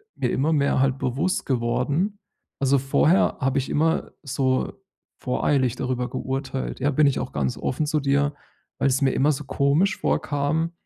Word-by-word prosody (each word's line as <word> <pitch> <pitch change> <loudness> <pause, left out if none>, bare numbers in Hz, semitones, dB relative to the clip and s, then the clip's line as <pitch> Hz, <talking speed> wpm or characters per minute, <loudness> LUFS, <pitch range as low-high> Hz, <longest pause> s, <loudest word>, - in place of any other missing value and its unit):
mir - - -1
immer 155 +4 +1
mehr 140 -2 +2
halt 135 0 +1
bewusst 140 +9 -1
geworden 140 - 0 0.4
also 135 0 +3
vorher 150 +6 +3
habe 135 +1 +1
ich 135 - -4
immer 160 +2 +1
so 130 -1 0 0.5
voreilig 130 -1 +1
darüber 125 -1 -2
geurteilt. 135 0 -4
Ja, 140 +3 +1
bin 150 +2 +3
ich 140 - +1
auch - - -5
ganz 65 -3 -1
offen 150 +4 -1
zu 150 0 0
dir, 140 +1 +1 0.5
weil's 135 +1 +2
mir 135 -1 +3
immer 145 +3 +3
so 150 - -5
komisch 150 +8 +1
vorkam, 150 +3 0
140 Hz, 160 wpm, -24 LUFS, 130-150 Hz, 0.5 s, also